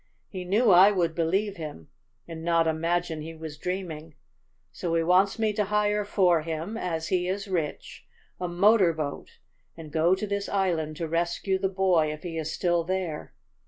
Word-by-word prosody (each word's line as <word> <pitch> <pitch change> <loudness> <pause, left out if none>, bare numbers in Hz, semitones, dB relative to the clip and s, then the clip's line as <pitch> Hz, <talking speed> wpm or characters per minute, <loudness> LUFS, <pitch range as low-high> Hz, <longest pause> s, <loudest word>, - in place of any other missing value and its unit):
He 185 -2 -6
knew 210 +4 +3
I 185 +3 +8
would 175 -5 0
believe 190 +5 0
him, 150 - -8 0.4
and 165 -1 -8
not 165 -1 +2
imagine 165 0 -1
he 165 +1 -8
was 160 -2 -8
dreaming. 165 -4 -5 0.6
So 170 -2 -3
he 165 - +2
wants 185 +5 +3
me 220 -2 +1
to 210 0 0
hire 210 0 +1
for 180 -5 +3
him, 165 +6 -4
as 165 -7 -3
he 180 -1 +1
is 200 +3 -3
rich, 170 -6 -4 0.3
a 180 - -2
motor 185 0 +4
boat 150 -3 -6 0.4
and 160 -2 -10
go 165 +4 +3
to 200 - -4
this 200 -1 -3
island 170 -6 0
to 165 - -3
rescue 170 +4 -1
the 195 0 0
boy 185 -5 +2
if 155 0 -8
he 165 -2 -4
is 160 0 -3
still 175 -1 +1
there. 180 -3 -4
175 Hz, 180 wpm, -27 LUFS, 160-195 Hz, 0.6 s, I